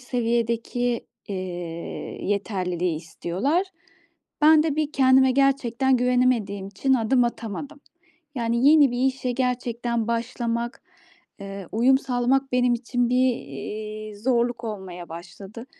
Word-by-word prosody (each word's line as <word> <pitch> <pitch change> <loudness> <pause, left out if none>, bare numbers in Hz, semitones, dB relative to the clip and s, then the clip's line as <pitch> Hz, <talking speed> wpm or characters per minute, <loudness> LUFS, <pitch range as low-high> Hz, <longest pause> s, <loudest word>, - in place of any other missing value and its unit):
seviyedeki, 235 0 -1 0.2
eee, 200 - -3 0.9
yeterliliği 180 -4 -1
istiyorlar. 185 - -1 0.8
Ben 310 0 +7
de 305 -2 -1
bir 305 -1 -1
kendime 265 -1 +5
gerçekten 265 -1 +2
güvenemediğim 245 -6 +1
için 265 +7 +1
adım 245 +1 +3
atamadım. 235 +6 -5 0.6
Yani 235 +3 +2
yeni 295 -4 +6
bir 245 - -2
işe 260 -1 -1
gerçekten 240 -2 -1
başlamak, 235 +1 -2 0.6
eee, 195 -1 -7
uyum 255 +4 +4
sağlamak 265 +1 0
benim 250 -1 +3
için 245 0 -1
bir, 250 - +2 0.2
iii, 210 +10 -7
zorluk 240 +1 0
olmaya 190 -5 -6
başladı. 190 +7 -10
235 Hz, 110 wpm, -24 LUFS, 210-260 Hz, 0.9 s, Ben